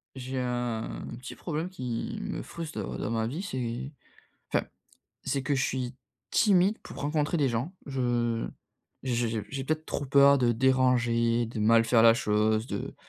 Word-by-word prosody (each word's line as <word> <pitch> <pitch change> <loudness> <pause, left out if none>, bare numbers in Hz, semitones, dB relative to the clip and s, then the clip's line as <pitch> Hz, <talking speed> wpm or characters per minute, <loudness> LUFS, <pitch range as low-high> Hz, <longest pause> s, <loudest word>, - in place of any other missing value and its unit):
J'ai 130 0 -4
un 120 -2 -3
petit 130 - -8
problème 165 +1 -3
qui 125 -10 -4
me - - -4
frustre, 165 -7 -7
heu, 100 - -4
dans 110 - -3
ma 115 -1 0
vie, 145 +10 -4
c'est 130 -6 -4 0.6
enfin, - - +3 0.6
c'est 135 0 -1
que 140 +2 0
je 135 - +1
suis 125 -2 -2 0.4
timide 200 0 +4
pour - - -10
rencontrer 150 +3 0
des 140 -3 +3
gens. 120 +8 -2
Je 120 -4 0 0.6
j'ai 120 -2 0
j'ai 110 -1 -2
j'ai 135 -1 -4
peut-être 155 +2 -2
trop 145 - -3
peur 140 +1 +6
de 120 -2 +3
déranger, 120 -2 +2
de 110 -1 -5
mal 115 +1 +5
faire 115 -1 +5
la 115 - +8
chose, 110 0 +1
de - - -5
125 Hz, 170 wpm, -28 LUFS, 115-140 Hz, 0.6 s, la